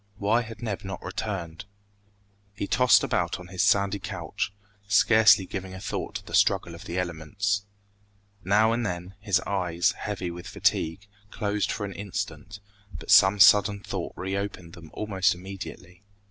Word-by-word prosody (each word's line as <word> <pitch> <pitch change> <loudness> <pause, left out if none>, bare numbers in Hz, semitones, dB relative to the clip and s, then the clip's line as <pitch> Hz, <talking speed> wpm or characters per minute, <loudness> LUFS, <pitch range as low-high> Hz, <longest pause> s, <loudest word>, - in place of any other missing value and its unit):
Why 105 +4 +2
had 115 0 -9
Neb 105 -4 -3
not 95 -2 -6
returned? 95 -4 -5 0.9
He 100 - -3
tossed 125 +3 +4
about 85 -1 -1
on 90 0 -11
his 90 0 -2
sandy 100 0 +2
couch, 95 -2 -4 0.4
scarcely 105 -1 +5
giving 95 0 -6
a - - -8
thought - - -4
to - - -5
the - - -11
struggle - - +2
of - - -11
the 85 - -4
elements. 95 +4 -2 0.8
Now 105 +3 +3
and 120 +1 0
then, 90 -2 -4
his 100 -3 +1
eyes, 90 -3 0
heavy 95 -4 -5
with 85 0 -9
fatigue, 80 +5 0 0.2
closed 105 0 -1
for 105 - -3
an 100 - -6
instant, 100 -1 -6 0.4
but - - -5
some 95 +2 +7
sudden 100 0 +6
thought 95 -3 -5
reopened 95 -2 -4
them 85 -2 -12
almost 95 -4 +1
immediately. 90 -1 -9
100 Hz, 155 wpm, -26 LUFS, 90-105 Hz, 0.9 s, some